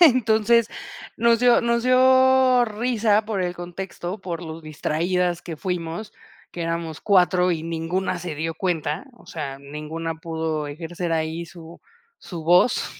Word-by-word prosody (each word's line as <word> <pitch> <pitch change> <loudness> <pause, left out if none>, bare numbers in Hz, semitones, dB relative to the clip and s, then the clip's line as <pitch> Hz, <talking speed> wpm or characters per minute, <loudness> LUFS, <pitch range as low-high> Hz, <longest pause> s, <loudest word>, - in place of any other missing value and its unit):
Entonces 235 -6 +5 0.5
nos 230 0 +4
dio 245 -1 +5
nos 235 0 +1
dio 260 0 +5
risa 220 -1 +1
por 210 -3 -2
el 180 0 -2
contexto, 175 +2 -6
por 175 -2 -5
lo 160 0 -7
distraídas 170 +3 -1
que 165 -3 -7
fuimos, 175 +3 -4 0.4
que 175 - -5
éramos 165 -2 -3
4 180 -2 +3
y 160 -2 -3
ninguna 170 +3 -2
se 175 -2 -5
dio 160 +2 -3
cuenta. 160 - -2
O 240 - -20
sea, 140 -4 -6
ninguna 150 +3 -5
pudo 160 -2 -3
ejercer 165 +3 -4
ahí 160 +1 -2
su 170 -1 -13 0.4
su 165 -4 -7
voz, 180 +8 +4
175 Hz, 145 wpm, -23 LUFS, 160-220 Hz, 0.5 s, Entonces